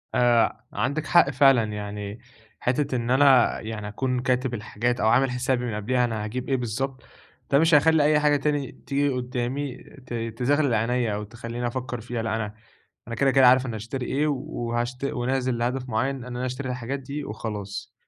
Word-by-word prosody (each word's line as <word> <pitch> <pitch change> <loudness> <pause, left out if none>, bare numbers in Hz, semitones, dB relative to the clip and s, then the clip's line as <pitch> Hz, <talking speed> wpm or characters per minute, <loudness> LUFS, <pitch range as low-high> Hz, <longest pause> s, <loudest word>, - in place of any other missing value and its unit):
آآ 120 -2 +3
عندِك 145 +1 -1
حق 135 - +5
فعلًا، 135 -3 +5
يعني 105 0 -5 0.4
حتة 130 +2 0
إن 120 0 -1
أنا 135 -2 +5
يعني 110 -1 -6
أكون 125 +4 -1
كاتب 125 0 0
الحاجات 120 +2 -2
أو 110 - +2
عامل 130 +3 +4
حسابي 125 0 0
من 115 -3 -3
قبليها، 125 +4 +1
أنا 110 -3 -3
هاجيب 125 +5 -4
إيه 135 - +3
بالضبط، 130 +3 -3 0.5
ده 140 - +5
مش 165 +1 +3
هيخلي 160 +1 +5
أي 150 0 +4
حاجة 150 -1 +3
تاني 145 -2 -1
تيجي 145 +1 -1
قدامي 125 +1 -3 0.3
ت 125 - -8
تزغلل 120 +4 0
عينيَّ، 115 0 +1
أو 105 +1 -3
تخليني 120 +2 -5
أفكّر 125 -1 -4
فيها، 120 0 -4
لأ 110 0 -1
أنا 105 -2 -3 0.5
أنا 115 - -4
كده 135 +3 +3
كده 130 -1 +6
عارف 130 +1 +5
أنا 120 -3 -4
هاشتري 120 +4 -5
إيه، 145 +5 0
وهاشت 120 -2 -3
ونازل 130 -1 -1
لهدف 125 +2 -2
معيّن 130 +5 0
إن 130 -3 -8
أنا 125 0 -4
أشتري 130 +1 -4
الحاجات 125 +2 -3
دي 140 +2 -6
وخلاص. 105 -2 -6
125 Hz, 185 wpm, -25 LUFS, 115-135 Hz, 0.5 s, كده